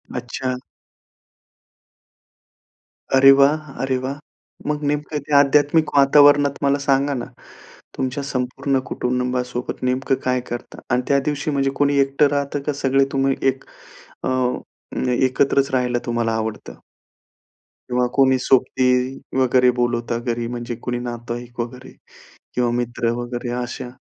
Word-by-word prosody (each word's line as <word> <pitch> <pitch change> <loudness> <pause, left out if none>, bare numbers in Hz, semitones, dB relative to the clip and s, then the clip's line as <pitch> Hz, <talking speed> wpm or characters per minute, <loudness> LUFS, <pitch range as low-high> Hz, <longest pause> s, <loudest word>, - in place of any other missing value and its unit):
अच्छा. 125 +1 -3 2.6
अरे 135 +1 +8
वाह! 140 +2 +5 0.2
अरे 135 -1 0
वाह! 130 +2 -4 0.5
मग 150 0 -1
नेमकं 150 +1 -1
ते 150 - -3
आध्यात्मिक 145 +2 +4
वातावरणात 145 0 +5
मला 140 0 +3
सांगा 140 0 +2
ना, 125 - -3 0.7
तुमच्या 135 +2 -2
संपूर्ण 130 +1 -1
कुटुंबासोबत 125 0 -2
नेमकं 130 +1 +1
काय 125 0 +1
करता 120 0 -7
आणि 125 - +3
त्या 140 -1 +3
दिवशी, 150 +1 -1
म्हणजे 135 -1 +1
कोणी 145 0 +2
एकटं 140 +2 +3
राहतं 140 0 -1
का, 150 0 -1
सगळे 135 -1 +2
तुम्ही 135 0 +1
एक 130 0 -5 0.6
अ, - - -1 0.8
एकत्रच 135 +2 +2
राहायला 125 -2 +1
तुम्हाला 120 -1 0
आवडतं? 110 -1 -4 1.1
किंवा 125 0 +1
कोणी 130 -1 +4
सोबती 130 0 +3 0.5
वगैरे 125 -1 +4
बोलवता 120 -1 0
घरी, 120 -1 -3
म्हणजे 120 0 -5
कोणी 120 -1 -2
नातेवाईक 120 0 -7
वगैरे 125 +2 -6 0.6
किंवा 120 -1 +1
मित्र 120 -1 -1
वगैरे, 120 0 -5
अशा 125 +1 -6
130 Hz, 120 wpm, -21 LUFS, 125-140 Hz, 2.6 s, अरे